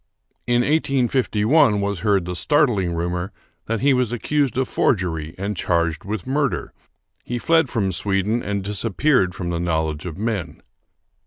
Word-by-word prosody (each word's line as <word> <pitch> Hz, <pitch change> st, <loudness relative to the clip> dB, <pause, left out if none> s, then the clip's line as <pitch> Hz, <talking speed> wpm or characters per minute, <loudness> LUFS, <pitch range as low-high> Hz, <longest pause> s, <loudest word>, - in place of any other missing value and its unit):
In 120 Hz, 0 st, +3 dB
1851 130 Hz, -4 st, +2 dB
was 100 Hz, -2 st, -2 dB
heard 100 Hz, -3 st, +1 dB
the 90 Hz, 0 st, -4 dB
startling 115 Hz, -, +2 dB
rumor 90 Hz, +3 st, -2 dB, 0.4 s
that 115 Hz, 0 st, -1 dB
he 140 Hz, +1 st, +4 dB
was 125 Hz, -3 st, +1 dB
accused 135 Hz, +2 st, 0 dB
of 130 Hz, -1 st, +1 dB
forgery 80 Hz, -6 st, 0 dB
and 100 Hz, +2 st, -3 dB
charged 85 Hz, -2 st, 0 dB
with 105 Hz, -2 st, -4 dB
murder. 140 Hz, 0 st, -1 dB, 0.5 s
He 120 Hz, -, -3 dB
fled 160 Hz, +2 st, +2 dB
from 105 Hz, -6 st, 0 dB
Sweden 100 Hz, +5 st, 0 dB
and 100 Hz, -2 st, -3 dB
disappeared 105 Hz, 0 st, +1 dB
from 85 Hz, -2 st, -4 dB
the 85 Hz, -, -2 dB
knowledge 80 Hz, -2 st, -1 dB
of 80 Hz, -, -7 dB
men. 105 Hz, -4 st, -3 dB
105 Hz, 150 wpm, -22 LUFS, 90-125 Hz, 0.5 s, he